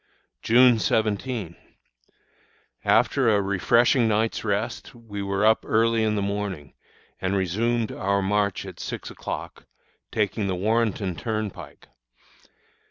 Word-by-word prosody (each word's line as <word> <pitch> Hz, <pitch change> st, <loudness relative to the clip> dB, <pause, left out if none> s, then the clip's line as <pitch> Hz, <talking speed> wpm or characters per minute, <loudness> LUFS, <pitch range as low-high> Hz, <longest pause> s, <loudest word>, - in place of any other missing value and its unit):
June 120 Hz, 0 st, +5 dB
17. 110 Hz, -4 st, -1 dB, 1.3 s
After 135 Hz, -4 st, +3 dB
a 105 Hz, -2 st, +3 dB
refreshing 115 Hz, +5 st, +3 dB
night's 110 Hz, +1 st, 0 dB
rest, 110 Hz, +4 st, -3 dB
we 110 Hz, -4 st, -7 dB
were 100 Hz, +1 st, 0 dB
up 110 Hz, 0 st, +4 dB
early 115 Hz, +1 st, +2 dB
in 110 Hz, -1 st, +1 dB
the 100 Hz, -, -1 dB
morning, 100 Hz, -8 st, -4 dB, 0.5 s
and 95 Hz, +1 st, -1 dB
resumed 110 Hz, +5 st, 0 dB
our 100 Hz, 0 st, 0 dB
march 100 Hz, -1 st, 0 dB
at -, -, -10 dB
six -, -, -6 dB
o'clock, -, -, -7 dB, 0.5 s
taking 100 Hz, -1 st, -1 dB
the 95 Hz, -, -1 dB
Warrenton 105 Hz, -2 st, 0 dB
Turnpike. 110 Hz, -3 st, -5 dB
105 Hz, 115 wpm, -24 LUFS, 100-115 Hz, 1.3 s, June